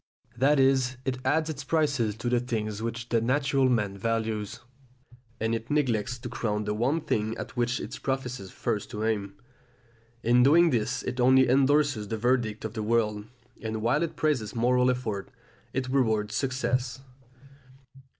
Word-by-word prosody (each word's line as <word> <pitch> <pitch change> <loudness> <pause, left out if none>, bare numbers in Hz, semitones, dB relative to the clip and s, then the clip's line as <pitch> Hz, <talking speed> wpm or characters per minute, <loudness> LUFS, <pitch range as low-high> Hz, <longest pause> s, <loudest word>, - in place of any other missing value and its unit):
That 135 +4 +3
is, 130 -1 +3
it 130 -1 -2
adds 155 +4 +1
its 145 -3 -5
prizes 135 -7 +1
to 115 - -5
the 120 0 +2
things 110 -3 -3
which 115 +1 -4
the 115 -2 +2
natural 135 +2 +2
man 105 -5 0
values, 110 -1 -2 0.8
and 115 +1 0
it 115 +1 -4
neglects 125 -5 0
to 120 - -7
crown 105 -3 -2
the 105 0 -2
one 130 +9 0
thing 110 -4 -1
at - - -7
which 120 0 0
it - - -6
professes 125 -6 -3
first 110 -1 -3
to 105 0 -4
aim. 100 -3 -1 0.9
In 120 +2 +4
doing 165 +6 +6
this 120 +1 -1
it 125 - -4
only 130 +1 +5
endorses 135 -3 +3
the 110 - -3
verdict 115 -2 0
of 110 - -5
the 110 - -3
world, 105 -2 0 0.4
and 110 -1 -4
while 125 +7 +2
it 170 -1 -2
praises 130 -10 0
moral 125 +2 +3
effort, 110 -6 -2 0.4
it 130 0 -2
rewards 110 -6 +1
success. 125 -1 -1
120 Hz, 160 wpm, -27 LUFS, 110-130 Hz, 0.9 s, doing